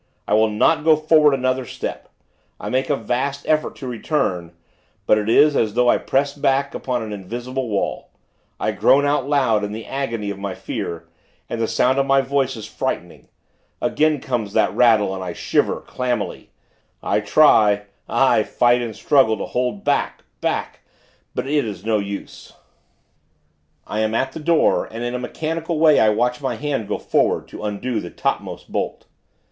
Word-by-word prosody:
I - - 0
will 110 +1 +4
not 150 +9 +2
go 160 0 +6
forward 155 -2 +4
another 130 0 0
step. - - -6 0.5
I - - -5
make 130 +1 0
a 145 - +3
vast 135 +4 -3
effort 155 0 +1
to 135 - -8
return; 110 - -2 0.5
but 105 - +4
it 105 +1 -2
is, 145 +5 +5
as 110 -1 +1
though 125 0 +4
I - - +2
press 140 +1 0
back, 140 0 0
upon 125 -3 -2
an 110 -1 -6
invisible 120 +6 -5
wall. 100 -2 -2 0.5
I - - 0
groan 140 +1 +4
out 145 -1 0
loud, 125 -8 +2
in 105 0 -3
the 110 +1 -7
agony 115 -7 -3
of 100 - -7
my 100 -2 -4
fear, 85 -1 -5 0.4
and 115 - -4
the 115 - +1
sound 125 +4 +2
of 135 - +1
my 135 0 +4
voice 135 0 0
is 110 - -7
frightening. - - -5 0.5
Again 155 -1 +1
comes 115 -7 -3
that 90 - +2
rattle, 110 -4 +4
and 95 -1 -5
I 90 -2 -5
shiver, - - 0
clammily. 125 -4 -3 0.5
I - - +1
try 105 -3 +4 0.3
aye, - - +3
fight 120 0 +2
and 115 -3 -5
struggle, 120 -6 +3
to - - -4
hold 125 +11 -2
back, 145 -1 0 0.2
back; - - -2 0.6
but - - -2
it 145 +1 +1
is 105 -4 -7
no 110 -1 +2
use.... 100 0 -7 1.3
I 105 - -4
am 110 0 0
at 135 +3 0
the 160 - -7
door, 160 +1 +2
and, 115 +2 -7
in 120 0 -3
a 125 - -2
mechanical 160 +5 -3
way, 155 -1 +5
I 110 - +5
watch 125 +4 0
my 130 -3 -2
hand 135 -4 -3
go - - -2
forward, - - 0
to - - -9
undo 110 +3 -2
the 90 - -7
topmost - - -4
bolt. - - -3
125 Hz, 180 wpm, -21 LUFS, 110-140 Hz, 1.3 s, go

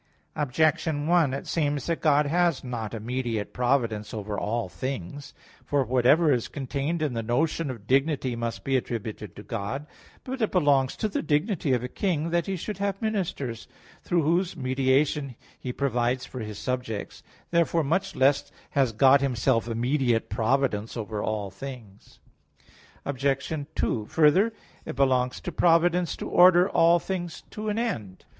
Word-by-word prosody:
Objection 150 +1 +1
1: 165 -4 +3
It 135 - -4
seems 145 -4 -1
that 170 -1 -2
God 150 -1 +4
has 170 0 +1
not 115 -4 -4
immediate 115 -1 -3
providence 120 -5 0
over 105 -1 -4
all 115 +1 -2
things. 130 +6 -6 0.3
For 140 -2 +1
whatever 130 +5 +4
is 120 -3 -1
contained 145 +4 -3
in 145 -5 -1
the 115 - -2
notion 145 +7 0
of 115 -6 -7
dignity, 135 0 +1
must 115 0 -4
be 135 - 0
attributed 110 -6 -4
to 105 - -10
God. 120 +11 -4 0.4
But 260 0 -5
it 220 - +1
belongs 145 -7 +3
to 215 - -1
the 205 - -2
dignity 155 - 0
of 125 -1 0
a - - -2
king, 165 +1 -1
that 170 +2 +1
he 195 - -1
should 200 +4 -5
have 200 -1 -1
ministers; 175 - -3 0.3
through 175 -3 +1
whose 175 +3 +1
mediation 135 +1 +1 0.2
he 125 - -4
provides 125 -1 0
for 130 - -8
his 105 -3 -6
subjects. 115 -1 -4 0.3
Therefore 170 -1 +2
much 165 +7 -1
less 140 +2 +2 0.2
has 135 -5 +2
God 135 +5 +5
Himself 120 -4 +1
immediate 120 0 0
providence 115 -2 0
over 105 -1 -4
all 105 -3 -2
things. 110 -2 -10 0.9
Obj. 140 +2 -1 0.2
2: 110 -3 0
Further, 170 +8 +4 0.3
it - - -6
belongs 130 -2 +2
to - - -4
providence 175 0 +3
to - - -5
order 180 0 +6
all 170 -2 +4
things 175 -2 -5
to 215 0 -4
an 210 - -1
end. 115 - -3
135 Hz, 155 wpm, -26 LUFS, 120-165 Hz, 0.9 s, order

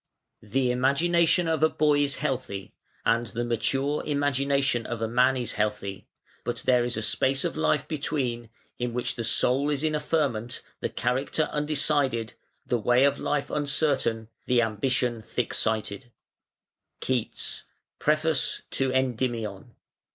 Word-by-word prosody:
The 125 +4 0
imagination 165 +7 +3
of 160 -2 0
a 160 - +5
boy 150 -2 +3
is 140 -1 +1
healthy, 125 -9 -3 0.3
and 115 +1 +2
the 120 +2 -3
mature 135 +6 0
imagination 140 -4 +1
of 120 - -4
a 115 - -1
man 125 +3 +3
is 120 -2 -2
healthy, 105 -2 -2 0.4
but - - -4
there 125 -1 +4
is 120 -2 -2
a 110 - -1
space 135 +5 +2
of - - -2
life 150 -2 +1
between, 130 -6 -2 0.3
in 120 -1 -2
which 125 - -1
the 115 - -4
soul 130 +5 +2
is 145 0 0
in 155 -1 +1
a 150 - +1
ferment, 135 -7 -1 0.2
the - - -2
character 130 +6 0
undecided, 145 -6 0 0.3
the 120 - 0
way 125 +4 +4
of 140 - +3
life 145 -1 -1
uncertain, 140 -6 +1 0.2
the 120 -1 +4
ambition 120 +2 0
thick 120 +2 -3
sighted. 110 +2 -1 0.9
(KEATS, 125 -4 -2 0.3
Preface 155 -1 +1
to 135 -1 0
"Endymion".) 120 -4 -2
130 Hz, 145 wpm, -27 LUFS, 115-145 Hz, 0.9 s, a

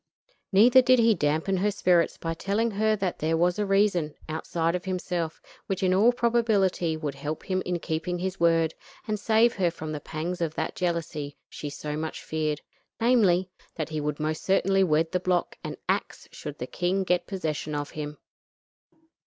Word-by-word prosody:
Neither 240 +6 +7
did 255 0 +5
he 230 -1 +5
dampen 160 +3 0
her 200 +3 +2
spirits 180 -4 +2
by 165 0 -3
telling 205 +7 0
her 215 +1 +2
that 190 -4 -2
there 160 +1 +1
was 175 +4 +2
a 205 - 0
reason, 195 -6 +2
outside 165 +1 -1
of 180 0 -3
himself, 180 -3 -2 0.3
which 190 -1 -2
in 185 0 +3
all 210 +6 +5
probability 220 -9 +1
would 150 -3 -3
help 145 +3 -5
him 185 -1 -1
in 180 -1 0
keeping 170 +2 -2
his 185 +1 -3
word, 165 -1 +3 0.3
and 215 -1 -1
save 225 +3 +4
her 180 -3 +3
from 160 -2 -6
the 150 - -3
pangs 165 +4 -4
of 160 -2 -1
that - - -2
jealousy 165 -5 -2
she 145 - -6
so 150 +1 -5
much 155 +1 -4
feared; 155 -1 -2 0.4
namely, 195 -7 +3 0.2
that 155 -2 -3
he 155 -1 -3
would 150 0 -2
most 155 +1 -2
certainly 195 0 +3
wed 160 -1 +2
the 180 - +1
block 180 -1 0
and - - -5
ax - - -2
should 150 0 -7
the 125 - -4
king 180 +7 -1
get 180 -1 0
possession 155 -5 -3
of 145 0 -3
him. 150 -1 -6
175 Hz, 185 wpm, -27 LUFS, 155-195 Hz, 0.4 s, Neither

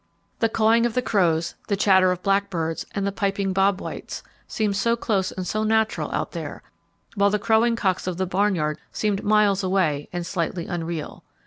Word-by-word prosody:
The 225 - +2
cawing 225 +2 +3
of 230 - -7
the 250 - +1
crows, 170 -7 +1
the 200 - +1
chatter 190 -2 +4
of 180 0 -4
blackbirds, 195 -5 -1
and 200 -1 -1
the 200 - 0
piping 195 -1 -1
bob 195 0 +2
whites, - - -7 0.2
sounded 210 -2 -1
so 230 +4 +2
close 200 -5 -1
and 185 - -5
so 215 +4 -1
natural 220 0 +1
out - - -2
there, - - -6 0.5
while 200 -1 +3
the 210 - +1
crowing 225 +2 +2
cocks 190 -5 -1
of 180 -2 -2
the 190 - 0
barnyard 180 -5 0
seemed 205 -2 -1
miles 205 -2 +3
away 180 -7 0
and 175 -1 -4
slightly 170 -1 -2
unreal. 170 -3 -5
195 Hz, 185 wpm, -24 LUFS, 180-215 Hz, 0.5 s, chatter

